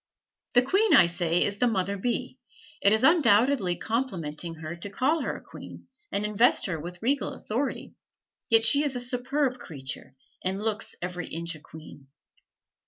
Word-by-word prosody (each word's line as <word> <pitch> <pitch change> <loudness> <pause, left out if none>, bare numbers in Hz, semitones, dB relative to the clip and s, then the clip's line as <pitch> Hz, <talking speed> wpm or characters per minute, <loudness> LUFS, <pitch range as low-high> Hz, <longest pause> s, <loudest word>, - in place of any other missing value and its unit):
The 245 - +6
queen, 395 - +3
I 185 - +8
say, 170 0 +1
is 205 0 -2
the 245 - +3
mother 200 -3 0
bee; 245 +5 -3 0.4
it 200 - +5
is 220 +2 +2
undoubtedly 245 - +4
complimenting 175 - -3
her 160 +1 -7
to 185 +4 -7
call 280 +10 +1
her - - -2
a - - -13
queen - - -12 0.2
and 205 - -1
invest 210 +4 +3
her 165 -4 -3
with 175 +5 -9
regal 275 +3 +1
authority, 260 +6 -4 0.6
yet 225 -1 +6
she 280 +6 +4
is 285 -3 -1
a - - -1
superb 250 +2 -1
creature, 135 - -8 0.3
and 190 +1 -1
looks 220 +1 -2
every 180 0 -4
inch 170 +1 -4
a 155 - -11
queen. 150 -2 -13
210 Hz, 170 wpm, -27 LUFS, 175-250 Hz, 0.6 s, I